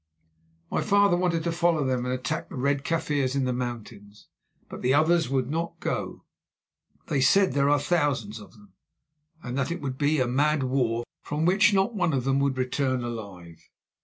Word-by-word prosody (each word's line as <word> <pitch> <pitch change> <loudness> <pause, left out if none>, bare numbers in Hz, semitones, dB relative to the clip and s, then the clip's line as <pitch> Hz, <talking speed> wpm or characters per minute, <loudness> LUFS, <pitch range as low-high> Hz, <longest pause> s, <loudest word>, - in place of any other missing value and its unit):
My - - 0
father 200 -2 +3
wanted 175 -2 0
to 170 - -1
follow 170 -2 +1
them 125 -1 -1
and 125 - -2
attack 130 - -4
the - - -9
Red 140 +1 0
Kaffirs 145 -5 -1
in 135 -1 +1
the 125 - 0
mountains, 115 -4 -7 0.4
but - - -9
the 130 +2 +2
others 165 0 +3
would 130 -2 0
not 165 +4 -3
go. - - -4 0.8
They 140 - -1
said 190 +8 +4
there 140 0 +2
are 145 0 +3
thousands 140 -9 -1
of 105 - -14
them, 105 -4 -20 0.7
and 125 0 -5
that 135 - -1
it 175 - -3
would 135 -4 -5
be 150 +1 +2
a 130 - +2
mad 145 +4 +1
war, 125 -3 0 0.2
from 150 +2 -2
which 190 +3 +4
not 195 +4 +1
one 175 -6 0
of 130 -2 0
them 135 +1 +1
would 140 -1 0
return 130 0 -1
alive. 95 -8 -8
140 Hz, 190 wpm, -26 LUFS, 125-165 Hz, 0.8 s, said